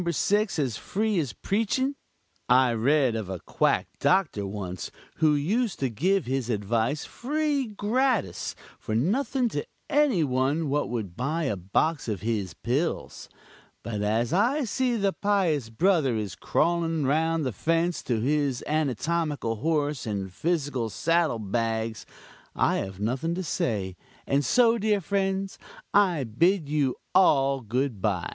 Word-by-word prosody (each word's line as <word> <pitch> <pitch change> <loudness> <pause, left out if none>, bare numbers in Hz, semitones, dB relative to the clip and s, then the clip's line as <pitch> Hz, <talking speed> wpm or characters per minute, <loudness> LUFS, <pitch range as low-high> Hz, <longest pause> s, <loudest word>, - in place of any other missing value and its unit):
6 205 +5 +1
as 130 -7 -1
free 210 -1 -1
as 140 -7 -2
preaching? 225 - 0 0.6
I 125 -1 +5
read 130 +1 +2
of 110 -4 -4
a 95 -2 -4
quack - - +1
doctor 180 - +2
once, 95 -3 -5 0.3
who 155 -1 +4
used 205 - 0
to 130 -3 -1
give 180 - +1
his 130 -1 -2
advice 115 +6 0
free 290 0 -1
gratis 220 - 0 0.2
for 110 - -3
nothing 245 - +1
to 145 -8 -3 0.3
any 285 - +3
one 140 +3 0
what 145 +1 0
would 110 -7 -4
buy 150 +8 -1
a 135 -8 0
box 130 - 0
of 105 -4 -3
his 105 -5 -2
pills 140 +8 -2 0.5
but 105 -3 -3
as 110 +4 0
I 245 - +2
see 250 +1 0
the 200 -3 +1
pious 180 - +1
brother 155 - +2
is 105 -4 -3
crawling 165 - 0
round 160 +3 +1
the 130 - 0
fence 165 - 0
to 120 -3 0
his 140 +1 0
anatomical 150 -3 -1
horse 150 0 0
and 100 -3 -3
physical 145 - -1
saddle 165 +1 +1
bags, 110 +1 -2 0.5
I - - +2
have 95 -1 -5
nothing 130 +10 -1
to 185 - -3
say, 105 - -2 0.3
and 140 +1 +2
so, 235 - +4
dear 210 -1 +2
friends, 195 +1 -1 0.4
I 185 -8 +4
bid 155 - +1
you 145 -4 +1 0.2
all 135 -7 +4
good 120 -1 -2
by." 95 -5 0
145 Hz, 145 wpm, -26 LUFS, 115-190 Hz, 0.6 s, I